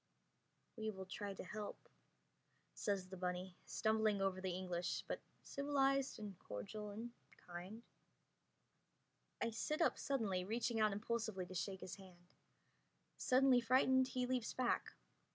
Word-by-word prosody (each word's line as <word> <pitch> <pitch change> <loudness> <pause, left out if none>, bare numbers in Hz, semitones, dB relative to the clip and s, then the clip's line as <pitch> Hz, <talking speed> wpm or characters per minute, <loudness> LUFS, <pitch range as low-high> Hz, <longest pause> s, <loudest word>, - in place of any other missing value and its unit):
we 220 -1 -1
will 190 -3 -5
try 200 +2 -4
to 195 - -6
help," 210 +2 -4 1.0
says 195 -3 0
the 190 - -6
bunny, 180 0 -2
stumbling 220 -2 +3
over 190 -1 +1
the 190 - -1
English, 180 -1 -1
but - - -2 0.2
civilized 275 -1 +2
and 205 -4 -6
cordial 210 - -5
and 225 +4 -5 0.4
kind. 180 +6 -6 1.6
I 230 - +1
sit 300 +7 -1
up 330 - +3
suddenly, 215 -10 +1
reaching 230 +3 0
out 215 -1 +5
impulsively 210 -2 -1
to 185 - -9
shake 190 +1 -2
his 185 - -5
hand. 180 -2 -15 0.8
Suddenly 255 -1 +5
frightened 260 +2 +5
he 255 -1 0
leaps 250 -2 0
back. 250 -2 +1
210 Hz, 135 wpm, -41 LUFS, 185-245 Hz, 1.6 s, out